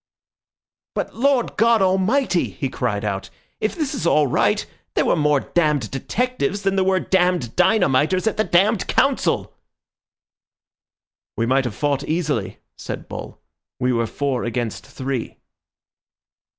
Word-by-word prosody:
"But - - -3
Lord 260 0 +1
God 230 +1 +4
Almighty," 190 +3 +2
he 135 - -4
cried 105 -5 -2
out, 100 -2 -3 0.3
"if 215 - -1
this 305 -5 -2
is 165 - -2
all 150 -2 +4
right, 130 - +1 0.3
there - - +2
were - - +3
more 150 -2 +2
damned 150 -9 0
detectives 205 - -2
than 195 0 +1
there 190 - +3
were 190 0 +2
damned 180 -11 +1
dynamiters 180 -2 +3
at 220 - +1
the 215 - +1
damned 200 +3 +2
Council!" - - +1 1.8
"We 115 - +1
might 130 +2 +2
have 120 - -4
fought 145 -2 0
easily," 150 - -1 0.2
said - - -7
Bull; - - -8 0.4
"we 125 0 +1
were 115 -1 0
four 135 0 -2
against 120 -2 -3
three." 130 -2 -4
155 Hz, 135 wpm, -21 LUFS, 130-195 Hz, 1.8 s, God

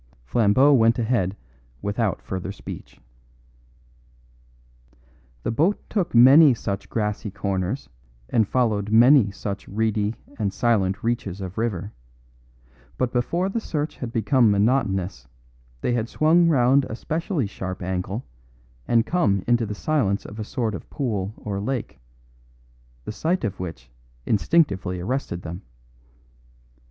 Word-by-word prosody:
Flambeau 120 - +4
went 115 -3 +4
ahead 110 -5 0 0.5
without 105 0 -1
further 95 0 -4
speech. 100 - -10 2.4
The - - -1
boat 165 - +2
took 185 - -1
many 135 +3 +8
such 100 -3 -4
grassy 105 -1 -2
corners 95 +4 -3 0.4
and 110 - +2
followed 105 -5 0
many 120 0 +6
such 100 0 -6
reedy 110 +1 0 0.2
and 100 -3 0
silent 100 -4 +1
reaches 115 -5 -2
of 95 +1 -6
river; 105 -3 -2 1.0
but 125 -1 -1
before 170 +9 0
the 195 +4 -2
search 150 -7 -3
had 120 -3 -5
become 120 +1 +3
monotonous 100 - 0 0.5
they 125 - 0
had 115 -1 -1
swung 170 +3 +4
round 135 -1 +4
a 110 - -6
specially 160 - -2
sharp 95 -2 -6
angle 95 +5 -3 0.6
and 115 -1 +3
come 100 - +1
into 120 -2 +2
the 105 - -4
silence 110 -9 0
of 105 - -9
a - - -2
sort 115 -1 -2
of 100 - -8
pool 105 -8 -2
or 100 -2 -4
lake, 125 +4 -4 1.1
the - - -4
sight 165 +10 -1
of 100 -4 -3
which 85 -8 -7 0.3
instinctively 100 - +1
arrested 95 -3 -3
them. 85 +2 -6
110 Hz, 125 wpm, -24 LUFS, 100-130 Hz, 2.4 s, many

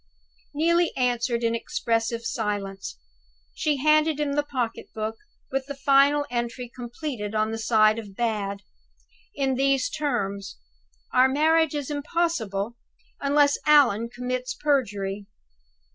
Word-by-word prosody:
Neelie 340 +3 +3
answered 240 -1 0
in 230 0 +2
expressive 230 0 -1
silence. 200 - -3 0.6
She 300 -2 0
handed 305 +1 +3
him 290 -1 0
the 295 - +2
pocket 250 -5 -3
book, 220 +1 -3 0.3
with 270 0 -2
the 280 - -5
final 280 +1 +4
entry 240 0 -3
completed, 240 -3 -5
on 215 0 +1
the 225 - -4
side 220 -1 +4
of 205 -3 -10
"Bad," 205 -3 -2 0.7
in 270 -2 +1
these 275 - +1
terms: 200 -9 -2 0.6
"Our 255 +1 +6
marriage 315 +2 +3
is 290 0 -3
impossible, 255 - -1 0.4
unless 285 0 +3
Allan 240 -7 +5
commits 250 +1 -3
perjury." 205 -9 -1
250 Hz, 120 wpm, -25 LUFS, 220-285 Hz, 0.7 s, Our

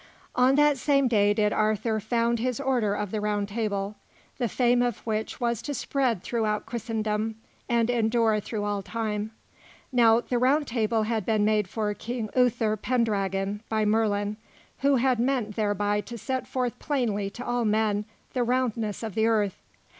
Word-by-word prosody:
On 255 +2 +4
that 295 -1 +4
same 275 -1 +3
day 205 -4 +3
did 210 0 +2
Arthur 215 +1 +1
found 230 +2 0
his 250 +2 -1
Order 245 -7 +1
of 205 -2 -3
the 215 - -2
Round 205 -1 0
Table, 205 -2 -2 0.5
the 240 -3 0
fame 245 +2 +3
of 245 -3 0
which 220 -1 -2
was 235 -3 0
to 290 - -4
spread 250 -10 0
throughout 215 -3 -1
Christendom 220 -1 -2 0.3
and 235 -1 +2
endure 225 -2 +2
through 210 0 -4
all 205 -1 -1
time. 215 0 -3 0.6
Now 230 -2 +5
the 240 0 -1
Round 280 +4 +3
Table 225 -2 0
had 220 -1 -1
been 215 +1 +1
made 210 -2 +2
for 210 +1 -2
King 230 0 -5
Uther 235 -4 +2
Pendragon 200 -4 0
by 220 -1 +1
Merlin, 210 -1 +1 0.4
who 280 0 +3
had 255 -1 +2
meant 240 -4 0
thereby 205 -1 0
to 235 +4 -8
set 260 +4 -3
forth 250 -1 -2
plainly 225 -9 -1
to 240 +5 -8
all 245 0 0
men 210 -1 +1 0.3
the 255 - 0
roundness 235 -4 -1
of 220 -3 -4
the 220 +3 +2
earth. 210 -4 +1
225 Hz, 170 wpm, -26 LUFS, 210-245 Hz, 0.6 s, Now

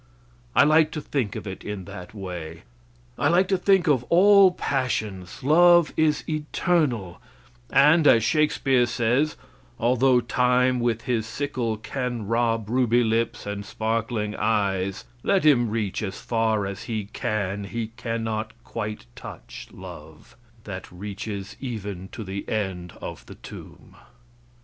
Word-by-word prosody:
I - - +7
like 155 +1 +5
to 155 - -3
think 125 -8 -2
of - - -6
it 95 -2 -7
in 100 -3 -5
that 90 +1 -9
way. 85 -5 -7 0.6
I - - +2
like 180 +2 +4
to 195 - +3
think 190 -1 +3
of 135 -5 +3
all 195 +5 +6
passions; 115 - -3
love 175 +3 +5
is 155 -1 +2
eternal, 150 - -1 0.5
and, 150 +3 +5
as 115 - +6
Shakespeare 135 -2 +2
says, 120 +6 +1 0.4
"Although 125 +2 +3
Time, 125 +1 +2
with 120 -1 0
his 115 -3 -1
sickle, 120 -4 -2
can 120 0 -4
rob 115 0 0
ruby 120 0 +2
lips 115 +1 -1
and 100 0 -4
sparkling 110 0 -2
eyes, 100 -3 0 0.2
let 195 +2 +2
him 120 -6 +5
reach 105 -2 -2
as 100 -2 -4
far 110 -3 0
as 95 0 -6
he 110 -3 -3
can, 100 -1 -2
he 110 +2 -4
cannot 110 -2 -3
quite 105 - -5
touch - - -10
love; - - -12 0.3
that 95 -3 -8
reaches 100 +1 -6
even 105 -7 -5
to 110 - -8
the 95 0 -6
end 95 -5 -3
of - - -7
the - - -10
tomb." - - -12
115 Hz, 140 wpm, -25 LUFS, 105-135 Hz, 0.6 s, I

